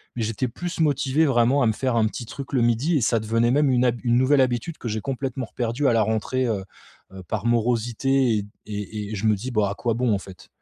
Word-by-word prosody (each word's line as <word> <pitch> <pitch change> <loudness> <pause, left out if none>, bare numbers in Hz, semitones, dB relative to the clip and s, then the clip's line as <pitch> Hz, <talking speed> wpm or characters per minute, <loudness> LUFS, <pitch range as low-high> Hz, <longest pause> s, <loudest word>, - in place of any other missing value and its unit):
mais 115 - -2
j'étais 115 +4 -1
plus 170 +8 -6
motivé 145 0 +2
vraiment 125 +2 +3
à 120 - +3
me 110 - +2
faire 130 0 -1
un 110 -1 +3
petit 120 - -6
truc 135 +5 -8
le 125 - +2
12:00 120 +8 +2
et 135 - 0
ça 115 +1 +2
devenait 115 +2 +1
même 145 +1 +3
une 125 -1 +3
hab 120 -1 +1
une 120 0 +2
nouvelle 135 +2 +4
habitude 130 +5 -1
que 120 - -5
j'ai 110 -1 -2
complètement 130 -1 -3
reperdue 120 +5 -2
à - - +4
la 115 - +3
rentrée, 110 +4 0
heu 105 -4 -1 0.5
heu, 95 - -9
par 110 0 -3
morosité 120 +1 +1
et 100 - -3 0.2
et 105 0 -5
et - - -3
je 105 - -3
me 105 - +4
dis: 125 +6 -6
«Bah, 105 -3 +1
à 100 - -4
quoi 115 +1 -1
bon 120 -1 +1
en 100 - +2
fait?» 95 -2 -13
120 Hz, 255 wpm, -24 LUFS, 110-130 Hz, 0.5 s, nouvelle